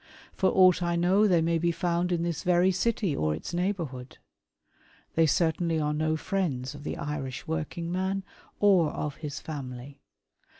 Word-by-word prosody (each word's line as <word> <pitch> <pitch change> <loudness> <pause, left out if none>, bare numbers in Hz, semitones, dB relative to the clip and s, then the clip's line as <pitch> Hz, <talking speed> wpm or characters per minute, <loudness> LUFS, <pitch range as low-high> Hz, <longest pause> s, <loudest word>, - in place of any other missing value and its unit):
For 190 - +2
aught 185 -1 +5
I 170 0 0
know 185 +5 +3
they 175 -4 +3
may 165 0 +1
be 170 +1 +1
found 175 +1 -1
in 170 -1 0
this 170 -2 -2
very 180 +1 +3
city 195 -4 0
or 75 0 0
its 80 - -7
neighbourhood. 170 -9 -3 1.0
They 165 0 +4
certainly 165 0 +1
are 150 -1 0
no 155 +1 0
friends 150 -9 -2
of 145 0 -10
the - - -4
Irish 135 -3 -4
working 165 - -3
man 190 +2 -1 0.4
or 190 -6 +5
of 150 -1 -4
his 150 -2 -6
family. 135 -2 -7
170 Hz, 165 wpm, -28 LUFS, 145-180 Hz, 1.0 s, aught